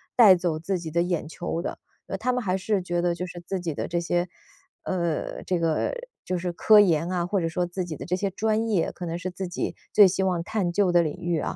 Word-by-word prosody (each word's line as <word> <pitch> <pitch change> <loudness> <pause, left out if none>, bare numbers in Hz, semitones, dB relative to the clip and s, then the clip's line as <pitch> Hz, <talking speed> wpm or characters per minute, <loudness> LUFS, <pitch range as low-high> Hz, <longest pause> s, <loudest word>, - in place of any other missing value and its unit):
带 215 -6 +9
走 175 -3 0
自 185 +3 -2
己 165 -2 -6
的 170 +2 +1
眼 175 -3 -2
球 170 +1 -4
的。 - - -4 0.3
呃， - - -3
他 250 - +1
们 250 -1 -1
还 185 -2 0
是 190 0 0
觉 175 -1 -1
得 175 -1 +1
就 180 - -4
是 175 -1 -9
自 190 -1 -2
己 170 -3 -3
的 - - -3
这 170 0 -1
些 175 +1 -1 0.5
呃， 170 -4 -2
这 180 -2 -1
个 165 -2 +1 0.3
就 185 0 -2
是 180 0 -2
科 215 +4 +6
研 170 -4 +3
啊， 180 -2 0
或 190 +1 0
者 165 - 0
说 180 +2 -1
自 175 +1 -4
己 165 -3 -5
的 - - -7
这 180 - 0
些 195 +2 -1
专 220 +3 0
业， 190 -7 +1
可 175 -1 -7
能 165 - -3
是 180 +1 -4
自 185 +1 -5
己 175 - -3 0.2
最 205 -2 +8
希 190 +1 -1
望 180 -3 0
探 190 -2 -1
究 190 0 +2
的 175 0 +5
领 155 -3 -2
域 170 -2 -1
啊， - - -3
175 Hz, 280 characters per minute, -25 LUFS, 170-190 Hz, 0.5 s, 带